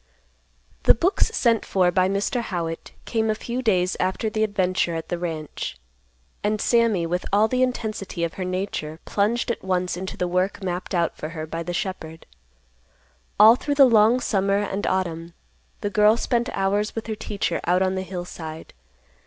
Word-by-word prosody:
The - - +7
books 360 - +2
sent 235 - +2
for 180 -2 +2
by 185 +1 +2
Mr. 200 +5 0
Howitt 170 -6 -4
came 220 -1 0
a 215 - +1
few 240 +3 -4
days 185 -6 +2
after 190 +4 -1
the 215 +1 0
adventure 185 -4 0
at 160 0 -5
the 175 - -2
ranch, 155 - -5 0.7
and 210 +1 0
Sammy, 230 -8 +2
with 175 +2 -1
all 210 +2 +4
the 255 +3 0
intensity 215 -8 -2
of 170 - -1
her 190 - -4
nature, 185 -4 -3
plunged 225 +4 0
at - - -5
once 180 -1 0
into 190 +1 -6
the 180 - -1
work 185 +3 -1
mapped 180 +1 -3
out 170 -1 +1
for 155 - -6
her 160 -1 -5
by 165 +1 -5
the 175 - -4
shepherd. 170 -3 -5 1.1
All 220 +2 +9
through 285 +3 -2
the 280 -1 +8
long 230 0 +5
summer 195 -4 +1
and 205 -1 -2
autumn, 170 -2 -2 0.5
the 205 - -2
girl 210 +2 +5
spent 240 0 0
hours 200 +2 0
with 225 - -4
her 220 - -3
teacher 205 -1 -2
out 180 +2 +3
on 185 0 +1
the 190 - -2
hillside. 175 -4 -7
190 Hz, 180 wpm, -24 LUFS, 175-220 Hz, 1.1 s, All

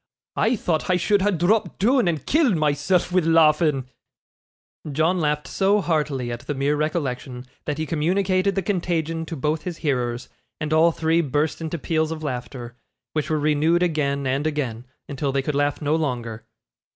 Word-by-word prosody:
I 225 +3 +2
tho't 170 -7 -1
I 180 - +4
should 200 +3 +2
ha' 205 - +3
dropped 195 +4 +1
doon, 245 +1 +3
and 160 -5 -1
killed 290 - +3
myself 155 +4 +1
wi' 185 - +4
laughing.' 155 -4 +3 1.0
John 160 +6 +1
laughed 150 -2 0
so 200 +2 +2
heartily 150 -8 -1
at 120 - -4
the 145 - -2
mere 140 +2 +1
recollection, 135 -5 -3 0.2
that 150 -1 -2
he 155 - -2
communicated 185 +5 +1
the 195 - 0
contagion 165 -3 -1
to 165 - -5
both 150 +2 -1
his 175 -1 -5
hearers, 125 -3 -1 0.3
and 155 0 -2
all 165 +2 +5
three 165 +1 +1
burst 150 +2 -1
into 160 +1 -3
peals 160 0 0
of 160 -1 -5
laughter, 125 -3 -5 0.4
which 155 0 -1
were 155 - +1
renewed 155 +3 +2
again 140 -5 0
and 135 +4 0
again, 130 -6 -3 0.2
until 140 0 -2
they 135 0 0
could 150 - -2
laugh 145 +1 0
no 150 +2 +2
longer. 120 -7 -3
155 Hz, 175 wpm, -23 LUFS, 140-170 Hz, 1.0 s, all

